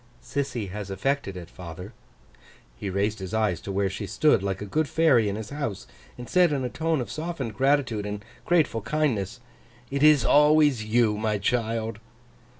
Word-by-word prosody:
'Sissy 125 -8 -3
has 100 0 -6
effected 100 0 -2
it, 85 -2 -8
father.' 90 +5 -9 0.8
He 95 - -5
raised 100 +3 -1
his 95 +2 -5
eyes 105 -7 +1
to 100 - -6
where 100 0 +1
she 100 +2 -5
stood, 150 -5 +3
like 95 -1 -2
a 105 - -5
good 150 +7 -1
fairy 130 -10 +4
in 100 - -3
his 110 0 -7
house, 140 -10 -4 0.3
and 125 -1 -8
said 180 -3 +4
in 140 -3 -1
a - - -2
tone 160 +1 -1
of 110 -4 -6
softened 155 -7 -4
gratitude 130 -5 +1
and 105 0 -6 0.2
grateful 155 -10 +2
kindness, 120 -6 -1 0.5
'It 140 0 -1
is 150 -4 +6
always 150 -5 +5
you, 110 -1 +2
my 110 -1 0
child! 115 0 -1
115 Hz, 175 wpm, -26 LUFS, 100-145 Hz, 0.8 s, is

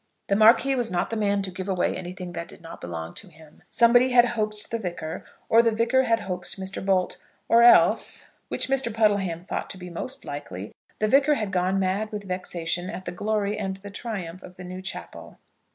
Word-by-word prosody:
The 200 - +3
Marquis 230 +6 +6
was 245 -3 0
not 175 +3 -1
the - - -1
man 200 -2 +1
to 190 - -2
give 185 +1 -5
away 185 -2 +1
anything 180 0 -6
that 170 -1 -5
did - - -12
not 165 -1 -11
belong 85 -1 -6
to 205 - -5
him. 160 -3 -18
Somebody 245 +2 +5
had 240 -1 +6
hoaxed 215 -2 -3
the 230 - -1
Vicar, 175 -4 -5 0.2
or 230 - +6
the 230 - +3
Vicar 235 +4 +2
had 230 -1 +2
hoaxed 185 -1 -5
Mr. 190 0 -5
Bolt; 190 -2 +1 0.3
or 230 - +6
else, 240 0 +5 0.2
which - - -2
Mr. 265 -3 0
Puddleham 200 -6 +1
thought - - -4
to - - -5
be 180 -1 -9
most 255 +10 -5
likely, 105 -10 -6 0.2
the 215 - +1
Vicar 275 +5 +4
had 215 -6 -3
gone 185 +1 +1
mad 195 +3 0
with 210 -1 -5
vexation 180 -1 -3
at 190 -3 -6
the - - -3
glory 210 +2 -1
and 195 -2 -2
the 200 +1 -10
triumph 195 -5 -5
of 180 0 -12
the 185 - -10
new 185 +1 -7
chapel. 190 - -8
195 Hz, 210 wpm, -25 LUFS, 180-225 Hz, 0.3 s, Marquis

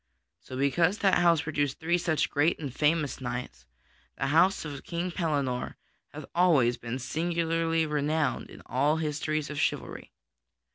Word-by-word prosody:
So 130 - -9
because 165 +8 +2
that 195 -4 +3
house 170 -3 +4
produced 145 -3 -1
three 175 +1 +1
such 165 -3 0
great 150 +4 +2
and 140 -5 -6
famous 150 -1 +1
knights, 120 - -5 0.5
the 135 - -1
house 185 +2 +4
of 145 -2 -7
King 175 +1 -3
Pellinore 145 -8 -1 0.4
hath - - -8
always 155 -9 +4
been 120 +1 -5
singularly 165 +3 0
renowned 150 0 -1
in - - -13
all 145 +5 +1
histories 155 -1 -2
of 150 - -4
chivalry. - - -2
155 Hz, 145 wpm, -28 LUFS, 140-165 Hz, 0.5 s, house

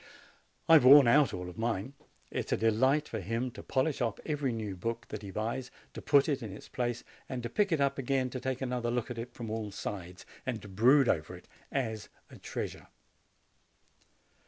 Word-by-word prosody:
I 165 - +6
have 155 - +8
worn 135 0 +9
out 145 +3 +5
all 90 0 -5
of 90 +2 -9
mine. 115 +2 -2 0.4
It - - -3
is - - -8
a - - +2
delight 130 +7 +2
for - - -4
him 115 +6 -2
to - - -10
polish 135 +3 0
off 115 -4 -1
every 145 -4 -1
new 110 -4 -4
book 115 +5 -4
that 105 - -6
he 100 - -8
buys, 115 +6 -3 0.2
to - - -7
put 140 -1 +4
it 140 -3 0
in 110 -4 -6
its 100 - -10
place, 120 -1 -2 0.3
and 125 -2 -4
to 120 - -3
pick 200 +4 +1
it 160 - +2
up 140 0 +1
again 130 -1 0
to 130 - -4
take 130 0 -3
another 125 -2 -1
look 120 0 -2
at 120 - -5
it 120 +1 -7
from 115 -3 -6
all 110 -1 -3
sides, 90 -2 -6 0.2
and 125 -5 -3
to - - -9
brood 120 +8 +4
over 75 -3 0
it - - -15 0.2
as 110 -6 -2 0.2
a - - -11
treasure. - - -5
120 Hz, 210 wpm, -31 LUFS, 110-135 Hz, 0.4 s, worn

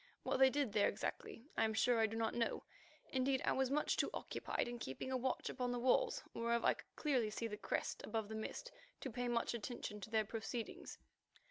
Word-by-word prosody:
What - - +1
they 265 0 +8
did 270 -5 0
there 210 -2 +5
exactly, 225 +3 -3
I - - +3
am 220 0 +1
sure 240 +1 +4
I 220 - +5
do 225 +1 -4
not 225 0 +1
know; 230 -1 0 0.5
indeed, 265 0 +2
I - - +3
was 265 -1 +2
too 275 - +2
much 300 - +2 0.2
occupied - - -2
in 240 0 -4
keeping 215 - -4
a - - +1
watch 255 +1 0
upon 250 -1 -1
the 245 - -1
walls 260 - +3
whereof 235 0 +1
I - - +6
could - - -15
clearly 260 -8 +2
see 220 +2 -3
the 215 -2 -2
crest 210 - -2
above 220 -1 -2
the 220 - -6
mist, 220 - -4 0.3
to 265 - -3
pay 245 +2 -2
much 240 0 +1
attention 225 -2 -4
to 220 - -6
their 220 -1 +2
proceedings. 225 +2 -4
235 Hz, 220 wpm, -39 LUFS, 220-260 Hz, 0.5 s, they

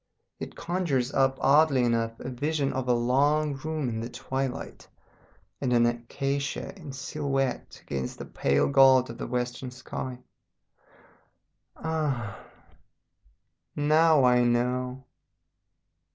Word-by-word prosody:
It - - -7
conjures 160 -8 -1
up 135 0 +2
oddly 140 -2 +4
enough 115 -1 0
a 125 - -5
vision 145 +2 -1
of 130 -1 -3
a 125 - +4
long 140 +5 +2
room 155 0 -3
in 115 -2 -3
the 115 +1 -4
twilight, 130 +1 -4 0.7
and 130 -3 0
an 120 -1 +4
acacia 135 +7 -2
in 160 -8 -9
silhouette 135 -1 -3
against 65 -2 -4
the - - -7
pale 70 0 +1
gold 130 -3 +5
of 115 - -11
the - - -4
western 125 +1 -3
sky. 125 0 -6 1.6
Ah! 145 -10 -2 1.3
now 155 0 +4
I 125 -1 +5
know! 125 +2 0
130 Hz, 115 wpm, -27 LUFS, 120-145 Hz, 1.6 s, gold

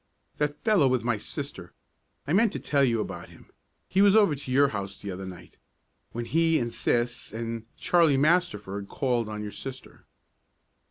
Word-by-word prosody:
"That 150 0 -2
fellow 205 -11 +4
with 130 -3 +1
my 120 -3 0
sister 140 - -6 0.5
I 150 - -1
meant 215 +2 +4
to - - -3
tell 140 -2 +1
you 115 -4 +2
about - - -6
him. - - -18 0.4
He 190 - +2
was 200 0 +6
over 205 -8 +5
to 135 -2 -6
your 140 +2 +4
house 100 -3 -5
the 100 - -6
other 95 +1 -6
night, 90 -2 -12 0.5
when 120 0 -4
he 165 +3 +2
and 120 -3 -2
sis, 120 0 -1
and 115 0 -5
Charlie 165 -6 +3
Masterford 135 - +1
called 120 -3 -1
on 105 0 -5
your 105 - -5
sister." 130 +3 -9
130 Hz, 175 wpm, -27 LUFS, 110-155 Hz, 0.5 s, was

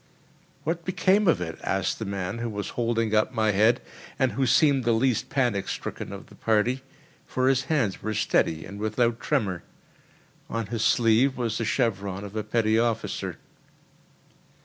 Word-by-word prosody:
"What 165 +2 -2
became 190 +3 +2
of 165 - +4
it?" 80 -2 -5
asked 95 -1 -1
the 110 - -3
man 100 +2 -3
who 120 0 -2
was 105 -1 -4
holding 115 -2 -1
up 110 +4 +3
my 110 -2 +3
head, 110 +5 +4 0.4
and 130 -2 +2
who 130 +4 0
seemed 140 +1 +4
the 120 0 +2
least 120 0 +1
panic 120 -8 0
stricken - - -5
of - - -8
the - - -18
party, 115 +4 +1 0.5
for 130 0 0
his 135 0 +2
hands 130 -12 0
were 110 0 -3
steady 80 -5 +1
and 100 0 -9
without 115 +2 0
tremor. 105 - -1 0.9
On 115 -1 -2
his 110 +1 -3
sleeve 120 +3 +3
was 115 -3 -1
the 115 - -1
chevron 100 -5 -1
of 100 +1 -8
a 110 - -1
petty 110 0 +2
officer. 115 -1 -1
115 Hz, 170 wpm, -26 LUFS, 105-130 Hz, 0.9 s, of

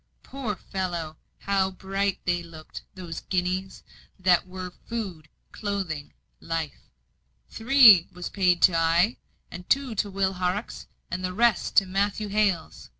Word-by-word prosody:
Poor 260 -7 -4
fellow! 175 -5 -4 0.3
how 195 -1 +1
bright 195 +1 -2
they 175 -1 +1
looked; 165 -2 -10
those 175 -3 -6
guineas, 185 0 -2 0.3
that 185 -1 +3
were 185 0 -7 0.2
food, 190 -10 -5 0.2
clothing, 190 -8 -4 0.3
life. 165 -3 -5 0.6
"Three 225 -7 +7
was 180 0 -6
paid 180 -3 +2
to 180 - +6
I, 165 +7 +3 0.5
two 270 -3 +1
to 205 -1 -1
Will 195 -1 0
Horrocks, 185 +4 -3 0.2
and 185 +1 -3
the 185 0 -2
rest 235 0 +2
to 195 - +6
Matthew 200 +2 -1
Hales. 195 - -1
185 Hz, 130 wpm, -26 LUFS, 175-205 Hz, 0.6 s, Three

